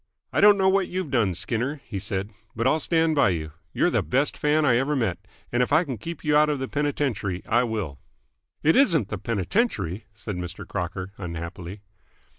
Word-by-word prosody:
"I - - +2
don't 205 -1 +8
know 190 -1 +3
what 190 -1 +3
you've 180 -5 -4
done, 110 -9 +2
Skinner," 125 - -2
he 100 - -5
said, 95 +2 -2 0.2
"but 115 +1 -1
I'll 155 +4 +3
stand 165 0 +2
by 140 -9 +4
you. 80 -4 -3 0.2
You're - - +2
the - - +2
best 135 +4 0
fan 150 +1 +2
I 125 -4 +4
ever 140 +4 +1
met, 105 -9 0 0.3
and 120 - +2
if 125 - 0
I 160 +4 +5
can 130 - -5
keep 165 +7 -7
you 150 -1 +2
out 150 0 +5
of 150 - 0
the 130 0 -3
penitentiary, 130 -11 -1
I 120 +2 +3
will." 105 - -4 0.6
"It 160 - +4
isn't 165 - +4
the 100 - -4
penitentiary!" 105 - -1
said 100 -1 -6
Mr. 90 0 -6
Crocker 90 +2 -4
unhappily. 90 +2 -6
120 Hz, 200 wpm, -25 LUFS, 95-150 Hz, 0.6 s, don't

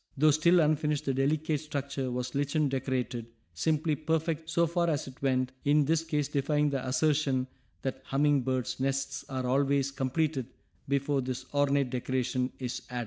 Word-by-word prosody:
Though 155 +2 +5
still 170 +4 +4
unfinished 150 -1 +1
the 135 - +1
delicate 150 +3 +1
structure 140 -3 -3
was 125 0 -3
lichen 145 +1 +1
decorated, 130 -3 -2 0.3
simply 155 - +1
perfect 160 +1 -1
so 170 +1 +3
far 170 +1 +1
as 150 -4 0
it 130 -1 -12
went, 130 -2 +1
in 145 0 +4
this 165 +2 +2
case 150 -3 -1
defying 145 +1 +1
the 135 -2 -2
assertion 135 0 +2 0.4
that 130 0 -3
humming 145 0 +2
birds' 130 0 -2
nests 135 +1 -1
are 130 -1 -2
always 140 +1 +2
completed 135 0 -1 0.4
before 140 0 +1
this 130 0 -4
ornate 140 -2 +2
decoration 130 0 -1
is 125 -1 -4
added. 125 -1 -3
140 Hz, 160 wpm, -30 LUFS, 130-150 Hz, 0.4 s, Though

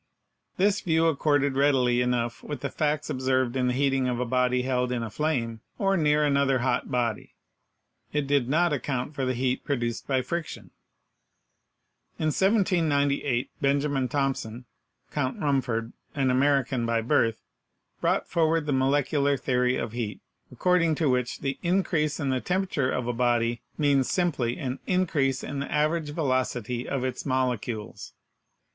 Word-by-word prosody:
This 200 +2 +2
view 165 -3 +2
accorded 145 -3 +2
readily 130 -3 +3
enough 120 -1 -1
with 145 -4 -6
the 140 - -3
facts 150 0 -1
observed 130 -1 0
in 130 -1 +1
the 125 - +1
heating 135 -1 +1
of 125 -1 -1
a 125 - 0
body 125 0 +1
held 125 -1 0
in 120 -2 -1
a 115 - -5
flame, 115 -7 -1 0.2
or 195 -1 +2
near 150 -3 +3
HEAT 145 - +3
51 - - +1
another 140 -2 +2
hot 125 -1 0
body. 120 -4 -2 0.8
It 150 -1 0
did 140 -3 +1
not 165 +2 +2
account 140 -1 -2
for 135 -3 -2
the 130 0 0
heat 130 +1 -1
pro 145 - 0
duced 120 -2 -3
by 130 -2 +1
friction. 170 +1 -5 1.5
In 155 - 0
1798 155 - +1
Benjamin 140 -1 +1
Thompson, 125 -3 -2 0.5
Count 130 -3 -2
Rumford, 125 -6 -1 0.2
an 135 -3 +2
American 135 -1 +2
by 115 0 +1
birth, 115 -2 +1 0.6
brought - - +1
forward 165 -1 +1
the 145 - 0
molecular 140 +1 +2
theory 125 -1 +1
of 110 - -3
heat, 115 -3 -4 0.3
according 180 -3 +2
to 150 -3 +1
which 125 -1 -1
the 135 0 -2
increase 170 -5 0
in 140 - -1
the 130 -1 0
temperature 180 -8 0
of 125 -2 -1
a 120 - -1
body 120 -1 +1 0.2
means 140 -3 +2
simply 140 -10 0
an 130 -1 -4
increase 150 -8 +1
in 140 - -4
the 140 - -5
average 155 +1 +1
velocity 130 -5 -1
of 135 -2 -1
its 130 -1 -3
molecules. 125 -5 -2
135 Hz, 160 wpm, -26 LUFS, 125-150 Hz, 1.5 s, readily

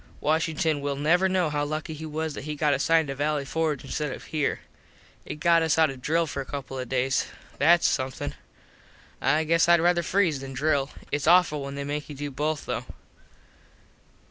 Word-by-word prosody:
Washington 160 -1 0
will 140 0 -2
never 170 +7 +2
know 180 -4 +1
how 145 0 0
lucky 155 +2 -4
he 160 +1 -7
was 155 0 -3
that 140 - -7
he 150 0 -4
got 150 0 +2
assigned 160 +3 +2
to - - -2
valley 145 0 -1
Forge 155 -1 -1
instead 150 +1 -3
of - - -7
here. 150 -2 -2 0.7
It - - -4
got 165 +2 +3
us 160 -1 +1
out 160 -3 +4
of 130 -1 -11
drill 165 +5 +1
for 140 -3 -4
a - - -7
couple 135 -2 -6
of 125 - -5
days. 130 0 +1 0.3
Thats 170 +4 +5
somethin. 130 -2 -2 0.9
I 150 +4 +2
guess 165 +2 +3
Id 170 0 +6
rather 175 +1 +3
freeze 170 -4 +1
than 135 0 -7
drill. 140 0 +1 0.2
Its 145 0 -1
awful 170 -4 +5
when 140 0 -6
they 140 - -4
make 145 +2 -4
you 145 - -7
do 145 +1 -5
both 150 +2 -2
though. - - -3
150 Hz, 195 wpm, -26 LUFS, 140-160 Hz, 0.9 s, Id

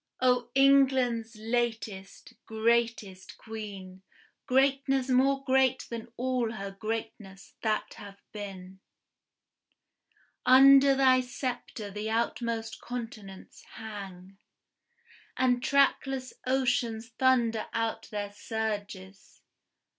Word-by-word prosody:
O 250 -1 +2
England's 260 -4 +3
latest, 225 -2 -4
greatest 220 -4 -1
Queen, 200 -4 -9 0.5
Greatness 270 0 +2
more 270 +2 +2
great 260 -1 +2
than 230 0 -6
all 250 -2 -1
her 200 -3 -6
greatness 215 -2 -6
that 215 -1 -1
hath 200 -1 -11
been, 190 -3 -9 1.6
Under 275 +1 +7
thy 260 -1 +4
sceptre 245 -4 -5
the 210 +2 -4
outmost 230 0 -2
continents 220 -6 -8
hang, 195 -3 -9 1.0
And 250 -1 +2
trackless 270 -1 +1
oceans 240 -3 0
thunder 235 -2 +1
out 225 -1 -3
their 205 -1 -4
surges. 205 -3 -6
230 Hz, 85 wpm, -29 LUFS, 210-255 Hz, 1.6 s, Under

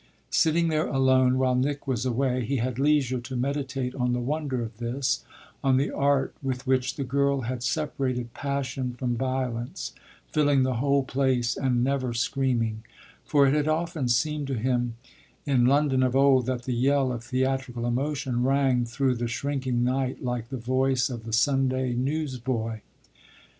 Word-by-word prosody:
Sitting 165 +1 +3
there 155 0 +1
alone 130 -1 +3
while 130 -1 +2
Nick 140 +3 -1
was 130 -2 -1
away 125 0 0
he 140 +5 -1
had 125 0 -2
leisure 140 -3 +2
to 120 +2 -7
meditate 135 0 -2
on 125 -2 0
the 125 - 0
wonder 135 -1 -2
of 110 -1 -8
this 125 +3 -1 0.4
on 135 -1 +4
the 140 - +1
art 140 -1 +1
with 135 -1 -3
which 130 0 +1
the 140 - -3
girl 140 +1 +1
had 125 +1 -4
separated 130 -5 -2
passion 135 -2 -3
from 125 -1 -1
violence, 125 -1 -3 0.3
filling 145 -3 +2
the 130 -2 0
whole 140 +2 +2
place 130 -3 0
and 125 -3 +1
never 130 -2 -1
screaming; 115 -3 0 0.4
for 140 -1 +4
it 135 - +3
had 150 0 +1
often 160 -3 -1
seemed 145 +4 0
to 135 - -2
him 120 0 0 0.5
in 130 -4 +3
London 140 -1 +3
of 130 0 +1
old 135 -2 +4
that 125 -1 -2
the 125 - -2
yell 135 +2 +2
of 120 -1 -6
theatrical 130 -1 -1
emotion 130 0 -1
rang 130 -2 +2
through 130 +3 0
the 120 -1 -2
shrinking 130 0 -1
night 130 +1 -1
like 125 -2 -3
the 135 - -4
voice 130 +2 +1
of 115 -2 -6
the 115 - -6
Sunday 130 0 +2
newsboy. 125 -4 -2
130 Hz, 165 wpm, -26 LUFS, 125-140 Hz, 0.5 s, on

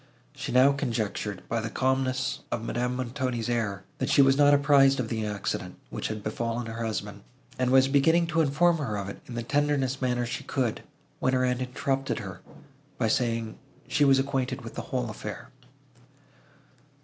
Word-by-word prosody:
She - - -5
now 130 +3 +6
conjectured, 110 -7 -3
by 115 -1 -1
the 115 - -3
calmness 130 +1 0
of 110 - -2
Madame 125 +2 -1
Montoni's 125 -2 -2
air, 105 -5 -1 0.2
that - - -1
she 140 - +6
was 135 0 +5
not 145 0 +5
apprised 140 -1 +5
of 115 -3 -2
the 110 -2 -2
accident, 105 -1 -3 0.2
which - - -3
had 110 -1 -5
befallen 115 +2 -2
her 115 +1 -5
husband, 105 -2 -4 0.4
and 130 -1 +2
was 130 +1 +6
beginning 160 +5 +4
to 165 - +4
inform 160 +3 +3
her 110 -8 -2
of 100 -1 -4
it, - - -9
in 120 - -7
the 120 - -3
tenderest 135 0 0
manner 125 -1 0
she 120 +1 -4
could, 125 -5 -1 0.4
when 130 - +1
her 130 0 +3
aunt 125 0 0
interrupted 135 +2 -1
her, - - -7 0.6
by 110 - +1
saying, 115 -2 -1 0.3
she 150 - +2
was 135 -1 +6
acquainted 135 -1 -1
with - - -8
the - - -4
whole - - -1
affair. - - -7
125 Hz, 180 wpm, -27 LUFS, 115-135 Hz, 0.6 s, now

